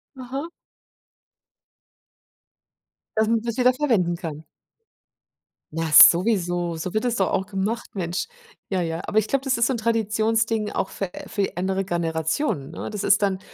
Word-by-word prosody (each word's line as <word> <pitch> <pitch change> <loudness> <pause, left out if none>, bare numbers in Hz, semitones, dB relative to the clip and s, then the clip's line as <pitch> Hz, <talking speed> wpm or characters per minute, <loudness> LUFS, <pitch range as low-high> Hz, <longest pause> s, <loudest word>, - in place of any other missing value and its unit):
Aha. 265 +5 -6 2.7
Das 220 0 +3
man 230 0 +1
das 235 0 -4
wieder 255 0 +4
verwenden 225 - +1
kann. 160 -3 -7 1.3
Na, 165 0 -2
sowieso, 175 -1 +5
so 175 +4 -5
wird 215 - 0
es 240 -1 0
doch 190 - +1
auch 190 - 0
gemacht, 205 +3 -3
Mensch. 175 -2 -3 0.4
Ja, 185 -2 0
ja, 165 0 -3
aber 215 - +2
ich 215 - -2
glaube, 275 -1 0
das 270 -3 0
ist 235 0 +3
so 265 - 0
'n - - -2
Traditionsding 225 0 0
auch - - -1
für 195 - -4 0.2
für 200 -2 -2
andere 190 +1 -1
Generationen, 160 - -2
ne? - - -6
Das 210 -2 -5
ist 205 +1 +4
dann 195 -2 0
200 Hz, 155 wpm, -23 LUFS, 175-230 Hz, 2.7 s, sowieso